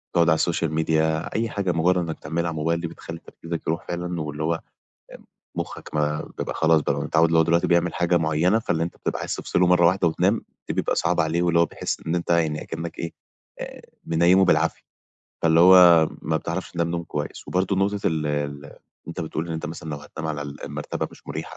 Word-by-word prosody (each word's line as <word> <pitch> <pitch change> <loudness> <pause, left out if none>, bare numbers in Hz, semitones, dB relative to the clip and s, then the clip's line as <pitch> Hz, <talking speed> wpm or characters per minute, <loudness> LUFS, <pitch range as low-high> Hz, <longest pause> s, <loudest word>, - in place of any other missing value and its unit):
تقعُد 85 -1 +4
على 80 - +5
السوشيال 80 -1 0
ميديا 80 0 0
أي 115 0 0
حاجة 100 -3 -1
مُجرّد 85 +2 +2
إنّك 85 -3 -2
لتعملها 85 +2 -3
على - - -2
الموبايل 80 +1 -1
دي 85 - -2
بتخلّي 80 0 -9
تركيزك 85 0 -7
يروح 85 +2 -2
فعلًا 90 -1 -3
واللي 75 0 -4
هو 80 - +1
آمم 80 - -5 1.0
مُخّك - - -6
ما 75 0 0 0.2
بيبقى - - -3
خلاص 80 0 +4
متعوّد 80 +1 +2
اللي 80 +1 +3
هو - - +7
دلوقتي 85 +1 +2
بيعمل 85 0 +2
حاجة 85 0 +2
معيّنة، 80 +6 +2
فاللي 85 -7 -1
أنت 85 - -4
بتبقى - - -3
عايز - - -3
تفصله 90 - +1
مرّة 90 -1 +5
واحدة 90 0 +3
وتنام 95 +7 +1 0.2
دي - - -2
بيبقى - - 0
صعبة - - +2
عليه 80 +2 0
واللي 85 -1 +3
هو 85 - +4
بيحس - - -3
إن 80 - 0
أنت 85 0 -2
يعني 80 -3 +1
أكِنّك 80 +1 -6
إيه، 85 - -4 0.5
آآ - - -7 0.2
منيّمه 85 +3 +4
بالعافية، - - +2 0.6
فاللي 80 0 +4
هو 90 -3 +8
ما 80 +1 0
بتعرفش 85 +4 -4
تنام 85 -1 -1
نوم 85 0 -2
كويس. 75 -2 -5
وبرضه 95 +1 0
نقطة 100 +1 +1
ال 80 -2 0
ال 70 -1 -4 0.3
أنت 85 - -5
بتقول 80 0 -3
إن - - -3
أنت 80 - -4
مثلًا 80 0 -7
لو 75 - -3
هتنام 80 +2 -7
على 75 -2 -3
ال 70 0 -8
المرتبة - - -4
مش - - -18
مُريحة - - -6
85 Hz, 210 wpm, -24 LUFS, 80-85 Hz, 1.0 s, هو